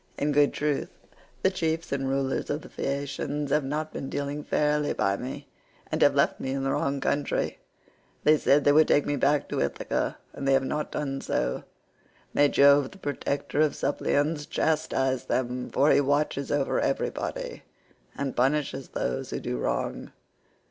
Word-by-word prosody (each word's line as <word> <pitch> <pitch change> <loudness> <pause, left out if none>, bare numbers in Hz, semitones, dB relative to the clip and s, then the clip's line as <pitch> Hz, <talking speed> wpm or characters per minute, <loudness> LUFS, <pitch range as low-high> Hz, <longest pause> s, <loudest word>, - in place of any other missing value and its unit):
In 145 +1 0
good 145 0 +4
truth 150 -1 -1 0.5
the 190 - +4
chiefs 165 -3 -2
and 135 -1 -1
rulers 135 0 -1
of 145 +1 -2
the - - -11
Phaeacians 140 +1 -3
have 150 0 +3
not 150 +3 -3
been 135 - -5
dealing 145 +1 -3
fairly 150 0 +1
by 100 0 +1
me, 135 +5 -6 0.4
and - - -1
have - - +5
left - - +2
me 130 - -3
in 135 0 -2
the 135 - 0
wrong 140 +1 0
country; 140 +1 -1 0.6
they 155 - +6
said 145 -1 +3
they 145 - +5
would 155 +2 +6
take 145 - +3
me 145 - 0
back 140 +2 +2
to - - -1
Ithaca 70 - -1 0.2
and 140 - -4
they 135 - +4
have 135 0 +3
not 150 +3 -2
done 135 -2 -3
so: - - -1 0.7
may 145 0 +4
Jove 140 -1 +5
the 195 - -15
protector 145 -2 -2
of 155 -2 +2
suppliants 145 +2 0
chastise 135 -5 0
them, 125 0 -2
for 145 +2 +3
he - - +5
watches 145 0 0
over 145 -2 +1
everybody - - -2 0.6
and 140 -2 -2
punishes 135 +1 0
those - - -3
who - - -3
do 60 - -3
wrong. - - -2
140 Hz, 170 wpm, -27 LUFS, 135-150 Hz, 0.7 s, they